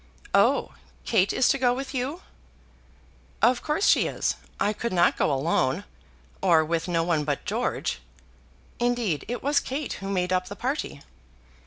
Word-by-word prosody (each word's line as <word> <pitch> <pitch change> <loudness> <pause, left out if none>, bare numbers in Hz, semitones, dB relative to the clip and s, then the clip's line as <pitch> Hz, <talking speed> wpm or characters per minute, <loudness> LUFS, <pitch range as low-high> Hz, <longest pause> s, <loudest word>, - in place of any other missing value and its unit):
"Oh! - - +3 0.3
Kate 200 -4 +3
is 255 - +3
to - - +2
go 245 -1 +3
with 270 +2 -5
you?" 275 +8 -3 1.2
"Of 245 +1 +3
course 310 +6 0
she - - +4
is. - - -1 0.2
I 205 +2 +1
could 235 +3 -3
not 175 -1 +3
go - - +1
alone, 135 -2 +1 0.6
or 165 -4 +4
with 165 +1 -1
no 165 -2 +1
one 165 -3 +1
but 145 -1 -2
George. 225 +4 -2 0.8
Indeed 240 - 0
it 245 +2 -4
was 285 +1 +3
Kate 275 +1 -4
who 195 - -4
made 185 -2 0
up 185 0 0
the 205 - -7
party." 250 - -3
205 Hz, 160 wpm, -26 LUFS, 170-250 Hz, 1.2 s, she